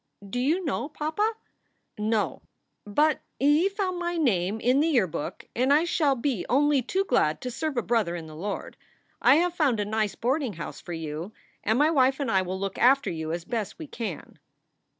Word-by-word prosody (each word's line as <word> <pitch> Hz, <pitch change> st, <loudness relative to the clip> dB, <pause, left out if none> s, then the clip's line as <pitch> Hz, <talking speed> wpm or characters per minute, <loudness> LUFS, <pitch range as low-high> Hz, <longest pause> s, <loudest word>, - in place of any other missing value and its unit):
"Do 220 Hz, +5 st, -3 dB
you 320 Hz, +8 st, +1 dB
know 285 Hz, 0 st, -2 dB
papa?" 315 Hz, +9 st, -1 dB, 0.6 s
"No, 215 Hz, 0 st, -1 dB, 0.4 s
but 295 Hz, +9 st, +2 dB, 0.2 s
he 295 Hz, +7 st, +4 dB
found 385 Hz, -3 st, -2 dB
my 345 Hz, 0 st, -2 dB
name 210 Hz, -, +1 dB
in 250 Hz, +4 st, +3 dB
the 310 Hz, -, +3 dB
Yearbook, 215 Hz, -, -1 dB
and 255 Hz, +3 st, +2 dB
I 300 Hz, +3 st, +5 dB
shall 305 Hz, -5 st, +2 dB
be 245 Hz, -5 st, -1 dB
only 285 Hz, +1 st, +3 dB
too 380 Hz, +11 st, -1 dB
glad 155 Hz, -, +2 dB
to 250 Hz, -, -4 dB
serve 275 Hz, +2 st, -3 dB
a 240 Hz, -, +1 dB
brother 220 Hz, -7 st, +1 dB
in 165 Hz, -2 st, -6 dB
the 155 Hz, -1 st, -11 dB
Lord. 195 Hz, +6 st, -5 dB, 0.4 s
I 255 Hz, -, +6 dB
have 345 Hz, +2 st, +2 dB
found 285 Hz, -10 st, +1 dB
a 205 Hz, -, 0 dB
nice 215 Hz, 0 st, -1 dB
boarding 260 Hz, -1 st, 0 dB
house 165 Hz, -3 st, -7 dB
for 175 Hz, -, -7 dB
you, 160 Hz, +4 st, -5 dB, 0.3 s
and 220 Hz, +3 st, +2 dB
my 300 Hz, +3 st, +4 dB
wife 265 Hz, -2 st, +3 dB
and 270 Hz, -5 st, -1 dB
I 190 Hz, -, +4 dB
will 185 Hz, +1 st, -4 dB
look 195 Hz, 0 st, -4 dB
after 275 Hz, +3 st, +4 dB
you 160 Hz, -1 st, -4 dB
as 170 Hz, +1 st, -4 dB
best 220 Hz, -4 st, -3 dB
we 320 Hz, -, -7 dB
can." 225 Hz, -, -6 dB
250 Hz, 195 wpm, -26 LUFS, 200-300 Hz, 0.6 s, I